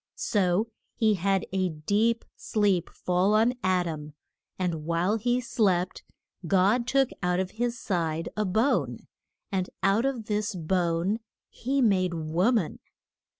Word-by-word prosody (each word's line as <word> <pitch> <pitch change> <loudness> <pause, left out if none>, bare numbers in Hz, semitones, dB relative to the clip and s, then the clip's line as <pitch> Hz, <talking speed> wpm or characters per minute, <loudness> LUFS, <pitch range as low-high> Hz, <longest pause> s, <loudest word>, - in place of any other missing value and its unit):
So 205 +1 +1 0.2
he 220 -2 +3
had 195 0 +1
a 185 -1 +1
deep 205 +9 0
sleep 200 -5 +1
fall 185 +4 +1
on 225 +3 +4
Ad 185 -1 +2
am, 150 -2 -6 0.4
and 175 -4 -2
while 170 +6 +1
he 245 +3 +1
slept 190 -7 0 0.5
God 200 +7 +3
took 270 0 +2
out 180 0 +1
of 190 0 -2
his 235 +1 -2
side 165 -4 -1
a 215 - 0
bone, 215 +8 0 0.5
and 185 -2 -1
out 200 +5 +3
of 250 -5 -3
this 210 0 -1
bone 175 +3 0 0.3
he 270 +2 -1
made 185 -5 +2
a - - -3
wo 165 +8 +1
man. 215 -10 0
190 Hz, 145 wpm, -27 LUFS, 175-225 Hz, 0.5 s, on